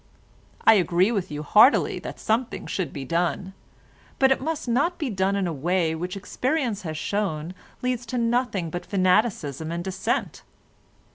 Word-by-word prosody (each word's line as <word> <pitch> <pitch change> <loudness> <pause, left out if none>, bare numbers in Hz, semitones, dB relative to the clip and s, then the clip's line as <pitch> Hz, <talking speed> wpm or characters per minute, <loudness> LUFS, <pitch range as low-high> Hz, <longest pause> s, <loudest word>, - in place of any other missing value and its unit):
I 225 - +9
agree 185 0 +3
with 200 -6 -2
you 150 0 -5
heartily 215 - +5
that - - -8
something 230 +3 -1
should 180 -7 -3
be 140 -2 -6
done, 175 +5 -1 0.6
but 265 0 +4
it 265 - +2
must 310 -1 -3
not 285 +9 +1
be 290 -7 -2
done 195 0 +1
in 200 -1 0
a 170 - -2
way 165 +3 0
which 180 +4 -4
experience 250 +1 -1
has 155 -3 -5
shown 180 -4 -2 0.3
leads 250 -2 -1
to 250 - -3
nothing 230 -7 0
but 175 - -4
fanaticism 180 - +1
and 170 +1 -3
dissent. 190 +1 -2
190 Hz, 160 wpm, -25 LUFS, 170-240 Hz, 0.6 s, I